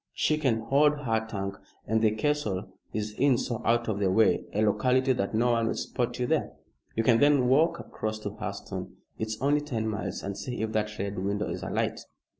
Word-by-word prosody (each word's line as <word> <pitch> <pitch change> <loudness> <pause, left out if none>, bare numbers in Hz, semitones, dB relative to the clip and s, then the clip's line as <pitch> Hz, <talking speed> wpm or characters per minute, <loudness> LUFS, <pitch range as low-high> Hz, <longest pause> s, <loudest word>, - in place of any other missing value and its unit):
She 155 0 +1
can 125 -7 +1
hold 145 +5 +3
her 110 -4 0
tongue, 100 -2 -4 0.3
and 110 +1 +1
the 110 - +5
castle 110 -4 -1 0.2
is 105 0 -3
in 135 -3 +4
so 120 -3 -3
out 120 +1 +2
of 105 -2 -1
the 100 -2 +2
way 110 +4 +3
a 105 - +1
locality 130 +5 +3
that 105 -3 -2
no 120 +2 +3
one 115 -1 +2
will - - 0
spot 120 -2 -2
you 125 - 0
there. - - 0 0.4
You 115 - +1
can 115 -1 +4
then 145 -3 +4
walk 160 +6 +3
across 110 0 -4
to 100 - -4
Hurseton 110 +2 -6 0.2
it's 110 0 -3
only 145 +3 +2
ten 120 -7 -2
miles 105 -1 -3
and 100 0 -4
see 110 +3 -4
if 110 - -2
that 105 -1 -1
Red 100 0 -3
Window 100 +2 -1
is - - -4
alight." - - -1
110 Hz, 210 wpm, -28 LUFS, 105-130 Hz, 0.4 s, the